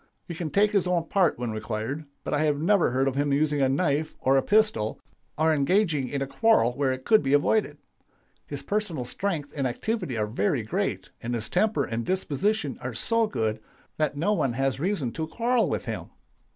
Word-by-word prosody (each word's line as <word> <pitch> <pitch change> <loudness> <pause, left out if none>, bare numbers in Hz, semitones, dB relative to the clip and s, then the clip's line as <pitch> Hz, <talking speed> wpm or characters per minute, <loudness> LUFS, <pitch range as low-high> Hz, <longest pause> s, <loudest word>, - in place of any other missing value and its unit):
He 170 - -5
can 165 -1 -4
take 205 +5 +3
his 200 -4 +2
own 175 -2 0
part 190 -4 +2
when 120 -2 -3
required, 110 +7 -4 0.2
but - - -3
I 145 - +2
have 150 -2 +1
never 185 +3 +3
heard 130 +2 +1
of 135 - 0
his 145 +2 0
using 145 +1 +1
a 135 - +3
knife 150 +1 0
or 135 +1 +3
a 135 - +4
pistol, 205 - +2 0.4
or 160 +1 +3
engaging 155 -1 +2
in 140 -1 -2
a - - -2
quarrel 140 - +3
where 135 0 0
it 130 0 -5
could 220 - +5
be 135 0 0
avoided. 180 +9 +2 0.7
His - - -5
personal 200 -11 -2
strength 155 0 -3
and 135 -3 0
activity 180 - -3
are 105 - +1
very 105 -1 0
great, - - -2
and 120 +1 -2
his 110 -2 -3
temper 220 0 +1
and 115 +1 -3
disposition 185 - -1
are 125 -2 -5
so 230 - +2
good 110 - -1 0.4
that 150 -2 0
no 175 +8 +1
one 135 - 0
has 135 +1 -1
reason 160 - -1
to 160 +4 -4
quarrel 235 +7 +1
with - - -2
him. - - -5
145 Hz, 205 wpm, -26 LUFS, 130-190 Hz, 0.7 s, could